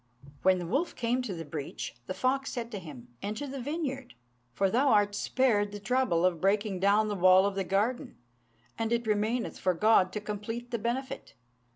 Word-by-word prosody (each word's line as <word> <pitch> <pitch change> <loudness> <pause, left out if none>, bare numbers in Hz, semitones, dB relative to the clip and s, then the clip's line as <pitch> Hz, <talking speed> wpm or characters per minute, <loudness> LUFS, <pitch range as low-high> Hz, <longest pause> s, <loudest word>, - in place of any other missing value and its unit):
When 190 0 +4
the 175 - -4
wolf 275 - -1
came 245 +1 0
to 240 -6 -4
the 165 -1 -6
breach, 145 -1 -5
the 185 - -4
fox 270 +1 0
said 240 -2 -5
to 205 - -4
him, 140 -8 -11
"Enter 215 +7 -4
the 275 -1 -6
vineyard; 275 -2 -4 0.4
for 195 +11 +1
thou 250 +8 +2
art 205 -4 +4
spared 205 -2 +1
the 205 - -7
trouble 205 -6 +1
of 175 -3 +1
breaking 200 0 +1
down 205 +3 +3
the 210 - -1
wall 185 0 +6
of 200 - 0
the 195 0 -1
garden, 210 +7 -1 0.6
and 225 0 -1
it 235 0 +1
remaineth 220 +3 -1
for 185 -1 +1
God 190 0 +4
to 210 - -2
complete 215 +3 -5
the 235 - -1
benefit." 260 - -4
210 Hz, 195 wpm, -29 LUFS, 190-245 Hz, 0.6 s, wall